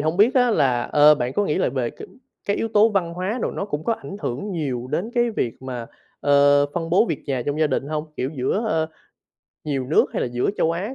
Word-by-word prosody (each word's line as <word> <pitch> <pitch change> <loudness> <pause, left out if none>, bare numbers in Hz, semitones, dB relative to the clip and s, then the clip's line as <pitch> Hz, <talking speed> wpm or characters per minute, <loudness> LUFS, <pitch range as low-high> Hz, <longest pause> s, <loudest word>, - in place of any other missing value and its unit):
hông 155 +2 0
biết 215 +7 +4
á 250 -2 +4
là, 130 - +2
ơ, 150 +3 +5
bạn 125 -2 -2
có 205 - +1
nghĩ 150 - 0
là - - +2
về 125 -2 -2
cái - - -11 0.4
cái 200 - +1
yếu 225 - -1
tố 215 +1 +5
văn 180 -6 -1
hóa 190 +7 -2
đồ - - 0
nó - - -4
cũng 150 -6 -4
có 230 - +1
ảnh 200 - -7
hưởng 135 +12 -4
nhiều 130 -7 -3
đến 180 +9 -2
cái 240 -1 +2
việc 125 - -3
mà, 125 -3 -5 0.3
ờ, 145 0 +4
phân 165 -1 -3
bố 190 +6 +4
việc - - -3
nhà 130 -4 -1
trong 145 +2 -1
gia 155 - +4
đình 135 -1 -2
hông? 155 0 -2
Kiểu 130 +2 -2
giữa, 135 - 0
ơ, 160 -4 0 0.8
nhiều 135 -4 -2
nước, 155 - +3
hay - - -1
là - - -1
giữa 120 +7 0
châu 165 - +2
Á 200 +9 -4
155 Hz, 250 wpm, -22 LUFS, 135-200 Hz, 0.8 s, ơ